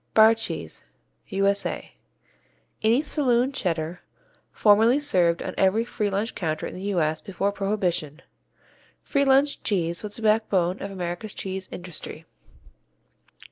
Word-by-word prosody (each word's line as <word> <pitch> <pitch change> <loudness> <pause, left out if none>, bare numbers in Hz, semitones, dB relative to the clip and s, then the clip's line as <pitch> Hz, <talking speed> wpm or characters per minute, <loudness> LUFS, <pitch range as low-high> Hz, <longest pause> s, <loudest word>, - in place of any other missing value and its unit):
Bar 220 +1 +8
cheese 225 0 -5 0.4
U.S.A. 200 0 -1 0.9
Any 230 +6 +3
saloon 260 -4 +1
Cheddar, 170 - -2 0.5
formerly 225 +5 +4
served 175 -12 +2
on - - -4
every 200 +4 +3
free 210 -3 -2
lunch 205 +4 -2
counter 155 -3 -3
in - - -6
the 185 - -8 0.2
U.S. 155 -1 +1
Before 195 +1 -2
Prohibition, 185 -7 -2 0.8
free 280 0 +1
lunch 275 +2 +3
cheese 170 -5 0
was 210 -1 -6
the 230 - -8
backbone 205 -5 +2
of 200 - -4
America's 180 +2 -5
cheese 190 0 -5
industry. 175 -2 -8
200 Hz, 125 wpm, -25 LUFS, 175-225 Hz, 0.9 s, Bar